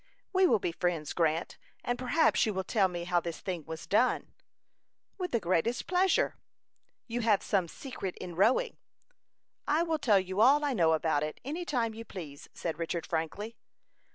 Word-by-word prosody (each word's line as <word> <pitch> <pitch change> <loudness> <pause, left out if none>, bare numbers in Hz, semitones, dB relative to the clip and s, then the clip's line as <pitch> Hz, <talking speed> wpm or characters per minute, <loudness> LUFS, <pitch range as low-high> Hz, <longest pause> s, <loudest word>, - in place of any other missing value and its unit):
"We 375 0 +5
will - - +4
be 180 - -2
friends, 165 -3 -2
Grant, 165 -1 0 0.2
and 245 0 -2
perhaps 255 +6 +3
you 210 - -1
will 190 - -1
tell 195 0 +2
me 175 -1 -5
how 175 0 +2
this 170 -1 -5
thing 175 -5 -4
was 160 0 -6
done?" 235 +5 +1 0.9
"With 365 -1 -2
the 235 - +1
greatest 185 +6 0
pleasure." 370 +1 +2 0.7
"You 240 0 -3
have 215 -3 +3
some 190 -4 +1
secret 195 - -6
in 180 -2 -7
rowing." 245 - +2 0.9
"I 310 +3 +3
will 325 -2 -1
tell 220 -8 +4
you 190 +2 -2
all 285 +5 +6
I 285 - +1
know 165 -7 +3
about 155 -2 +1
it, 150 0 -4
any 325 +6 -3
time 235 -7 0
you 225 +1 -7
please," 155 -10 -9
said 165 -1 -4
Richard, 165 0 -2
frankly. 185 +8 -3
195 Hz, 180 wpm, -30 LUFS, 170-255 Hz, 0.9 s, all